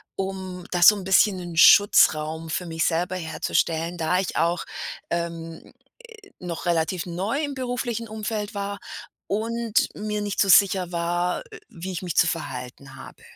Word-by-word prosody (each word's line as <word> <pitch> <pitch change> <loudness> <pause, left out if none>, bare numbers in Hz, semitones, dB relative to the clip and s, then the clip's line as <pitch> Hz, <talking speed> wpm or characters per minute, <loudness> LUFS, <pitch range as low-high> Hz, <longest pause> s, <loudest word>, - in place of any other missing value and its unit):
um 190 -2 -5
da 175 -1 -1
so 210 - +9
'n 195 - -7
bisschen 190 +1 +4
'nen 175 -2 -7
Schutzraum 160 -4 +5
für 180 +2 -2
mich 165 0 -1
selber 175 +2 0
herzustellen, 165 +1 -1
da 165 +2 +1
ich 190 - -3
auch, 170 +1 +1 0.5
ähm, 165 -1 -5 0.5
äh, 400 - -18
noch 175 -1 -6
relativ 170 +1 0
neu 195 - -2
im 285 -1 -4
beruflichen 245 -3 -3
Umfeld 215 0 -4
war 200 0 -4 0.5
und 225 +1 0
mir 210 0 -3
nicht 205 -1 -2
so 195 - +3
sicher 190 -1 +5
war, 175 +1 -1
äh, - - -10
wie 185 +2 -7
ich 180 - -5
mich 175 -3 -4
zu 170 - +5
verhalten 135 -4 -5
habe. 135 - -13
180 Hz, 160 wpm, -24 LUFS, 165-205 Hz, 0.5 s, so